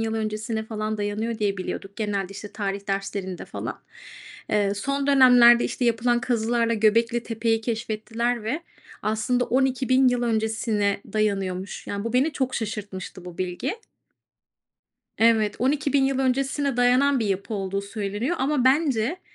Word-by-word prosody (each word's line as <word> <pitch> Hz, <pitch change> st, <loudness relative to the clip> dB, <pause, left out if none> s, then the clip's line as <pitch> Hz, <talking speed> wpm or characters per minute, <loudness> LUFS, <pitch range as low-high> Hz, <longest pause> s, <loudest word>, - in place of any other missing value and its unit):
yıl 225 Hz, 0 st, -1 dB
öncesine 220 Hz, 0 st, -3 dB
falan 215 Hz, -1 st, -3 dB
dayanıyor 215 Hz, +2 st, -2 dB
diye 205 Hz, -2 st, 0 dB
biliyorduk 195 Hz, +1 st, -6 dB
genelde, 205 Hz, -3 st, -1 dB
işte, 205 Hz, +1 st, -9 dB
tarih 200 Hz, -1 st, -4 dB
derslerinde 195 Hz, -2 st, -3 dB
falan. -, -, -6 dB, 0.7 s
Eee, 205 Hz, -1 st, +2 dB
son 275 Hz, +6 st, -2 dB
dönemlerde, 245 Hz, -3 st, +7 dB
işte, 250 Hz, -, -2 dB
yapılan 240 Hz, +1 st, +2 dB
kazılarla 230 Hz, -1 st, +1 dB
Göbeklitepe'yi 225 Hz, +1 st, +1 dB
keşfettiler 230 Hz, +1 st, -2 dB
ve 275 Hz, +9 st, -2 dB, 0.4 s
aslında 220 Hz, +3 st, 0 dB
12.000 260 Hz, 0 st, +2 dB
yıl 245 Hz, -1 st, 0 dB
öncesine 220 Hz, -3 st, 0 dB
dayanıyormuş. 195 Hz, -3 st, -2 dB
Yani, 200 Hz, +1 st, -4 dB
bu 230 Hz, -, -3 dB
beni 270 Hz, +6 st, +2 dB
çok 260 Hz, -2 st, -2 dB
şaşırtmıştı 200 Hz, -4 st, -5 dB
bu 180 Hz, -1 st, -10 dB
bilgi. 180 Hz, -, -2 dB, 1.4 s
Evet, 220 Hz, -2 st, +3 dB
12.000 280 Hz, +1 st, +2 dB
yıl 270 Hz, -1 st, 0 dB
öncesine 270 Hz, +1 st, 0 dB
dayanan 250 Hz, +2 st, +3 dB
bir 220 Hz, -, 0 dB
yapı 200 Hz, +3 st, -2 dB
olduğu 195 Hz, -1 st, -2 dB
söyleniyor 205 Hz, -, -3 dB
ama 270 Hz, -1 st, +1 dB
bence 270 Hz, +2 st, +2 dB
225 Hz, 135 wpm, -24 LUFS, 205-250 Hz, 1.4 s, dönemlerde